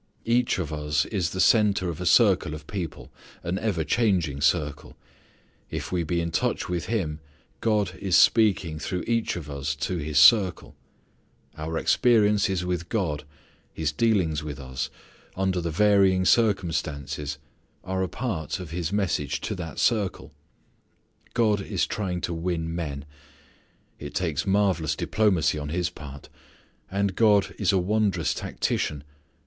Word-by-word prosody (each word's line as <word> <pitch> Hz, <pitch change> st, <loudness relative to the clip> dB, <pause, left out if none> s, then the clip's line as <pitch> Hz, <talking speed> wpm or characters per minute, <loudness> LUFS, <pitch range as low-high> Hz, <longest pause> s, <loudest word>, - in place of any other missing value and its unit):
Each 120 Hz, +1 st, +2 dB
of 80 Hz, -5 st, -3 dB
us 75 Hz, 0 st, 0 dB
is 95 Hz, -6 st, -1 dB
the 95 Hz, -, -5 dB
centre 105 Hz, -3 st, +4 dB
of 85 Hz, -1 st, -4 dB
a 90 Hz, -, -1 dB
circle 75 Hz, -1 st, +4 dB
of 75 Hz, -1 st, -10 dB
people, 90 Hz, -3 st, -6 dB, 0.3 s
an 90 Hz, +3 st, -2 dB
ever 100 Hz, -8 st, -1 dB
changing 85 Hz, -, +1 dB
circle. 75 Hz, 0 st, 0 dB, 0.7 s
If -, -, -5 dB
we 90 Hz, -1 st, 0 dB
be 85 Hz, +2 st, -1 dB
in 85 Hz, 0 st, -3 dB
touch 80 Hz, -, -1 dB
with 85 Hz, -3 st, -3 dB
Him 85 Hz, -10 st, -2 dB, 0.4 s
God 105 Hz, -5 st, +1 dB
is 95 Hz, -4 st, +1 dB
speaking 95 Hz, -6 st, +4 dB
through 90 Hz, +3 st, -3 dB
each 115 Hz, -1 st, 0 dB
of 85 Hz, -4 st, -6 dB
us 70 Hz, 0 st, -3 dB
to 75 Hz, +5 st, -2 dB
his 75 Hz, -1 st, -3 dB
circle. 100 Hz, -7 st, +5 dB, 0.8 s
Our 80 Hz, +1 st, -4 dB
experiences 105 Hz, -6 st, +3 dB
with 90 Hz, -1 st, -3 dB
God: 75 Hz, -9 st, -1 dB, 0.5 s
His 80 Hz, -2 st, -2 dB
dealings 85 Hz, -4 st, +1 dB
with 75 Hz, -2 st, -6 dB
us, 65 Hz, -2 st, -4 dB, 0.5 s
under 95 Hz, -1 st, 0 dB
the 85 Hz, -, -2 dB
varying 95 Hz, 0 st, +3 dB
circumstances 80 Hz, -, 0 dB, 0.5 s
are 95 Hz, 0 st, -2 dB
a 95 Hz, -, -1 dB
part 100 Hz, -, -3 dB
of 90 Hz, -4 st, -8 dB
His 85 Hz, 0 st, -3 dB
message 85 Hz, -9 st, -1 dB
to -, -, -3 dB
that 85 Hz, -5 st, -7 dB
circle. 105 Hz, -6 st, 0 dB, 1.0 s
God 110 Hz, -4 st, +2 dB
is -, -, -1 dB
trying 90 Hz, -4 st, -3 dB
to 85 Hz, -, -2 dB
win 80 Hz, -1 st, -2 dB
men. 75 Hz, -4 st, -4 dB, 0.9 s
It 75 Hz, +4 st, -8 dB
takes 80 Hz, -5 st, -1 dB
marvellous 95 Hz, -6 st, +1 dB
diplomacy 85 Hz, -7 st, +1 dB
on 75 Hz, 0 st, -5 dB
His 90 Hz, +2 st, -1 dB
part. 70 Hz, -2 st, -10 dB, 0.6 s
And 100 Hz, -1 st, -1 dB
God 105 Hz, -3 st, +3 dB
is 100 Hz, -3 st, +3 dB
a 95 Hz, -, +2 dB
wondrous 95 Hz, -2 st, +1 dB
tactician. 75 Hz, -2 st, -2 dB
90 Hz, 145 wpm, -25 LUFS, 75-100 Hz, 1.0 s, circle